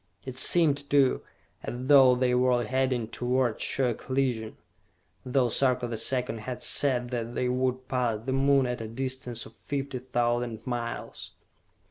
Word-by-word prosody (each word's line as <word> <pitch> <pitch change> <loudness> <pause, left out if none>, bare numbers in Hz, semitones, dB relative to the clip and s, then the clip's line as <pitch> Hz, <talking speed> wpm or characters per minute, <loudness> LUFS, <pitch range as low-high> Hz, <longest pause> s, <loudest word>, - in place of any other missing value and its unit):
It 130 -1 -6
seemed, 145 0 +3
too, 140 -2 +3 0.4
as - - -5
though 135 -2 +7
they 125 0 +1
were 125 -1 +2
heading 130 -3 0
toward 125 0 -1
sure 125 -3 0
collision, 125 -3 -2 0.7
though 130 -1 +1
Sarka 125 0 +1
the 115 - -4
Second 125 +1 -1
had 125 +3 -6
said 125 -4 +1
that 120 -1 -4
they 125 - 0
would 130 0 -1
pass 125 -4 0
the 130 - -1
Moon 135 0 +3
at 125 -1 -3
a 110 - -5
distance 125 0 -4
of 110 - -14
fifty 135 +1 -5
thousand 120 -2 -2
miles. 120 -2 -5
125 Hz, 150 wpm, -27 LUFS, 120-130 Hz, 0.7 s, though